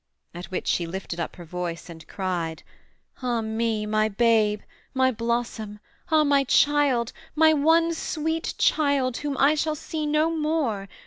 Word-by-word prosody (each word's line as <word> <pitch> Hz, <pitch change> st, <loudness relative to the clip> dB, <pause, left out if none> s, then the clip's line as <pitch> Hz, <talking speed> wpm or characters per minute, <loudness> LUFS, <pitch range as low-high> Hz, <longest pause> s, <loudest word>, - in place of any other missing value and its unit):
At 175 Hz, +2 st, -7 dB
which 185 Hz, -, -4 dB
she 170 Hz, -, 0 dB
lifted 175 Hz, -1 st, -6 dB
up 170 Hz, -, -4 dB
her 175 Hz, -, -11 dB
voice 175 Hz, 0 st, -5 dB
and 160 Hz, -2 st, -12 dB
cried. 175 Hz, -4 st, -3 dB, 0.6 s
'Ah 240 Hz, -2 st, 0 dB
me, 220 Hz, -1 st, -1 dB
my 215 Hz, 0 st, +1 dB
babe, 215 Hz, -1 st, +2 dB, 0.3 s
my 260 Hz, 0 st, +3 dB
blossom, 230 Hz, -2 st, -3 dB, 0.3 s
ah, 315 Hz, -1 st, +4 dB
my 285 Hz, -1 st, +3 dB
child, 275 Hz, -3 st, +2 dB, 0.2 s
My 315 Hz, 0 st, +5 dB
one 325 Hz, +3 st, +3 dB
sweet 320 Hz, 0 st, -3 dB
child, 280 Hz, -5 st, +2 dB
whom 290 Hz, -2 st, -3 dB
I 280 Hz, +2 st, +4 dB
shall 310 Hz, 0 st, -1 dB
see 305 Hz, 0 st, -4 dB
no 305 Hz, +2 st, +2 dB
more! 300 Hz, -11 st, -1 dB
240 Hz, 150 wpm, -25 LUFS, 205-300 Hz, 0.6 s, My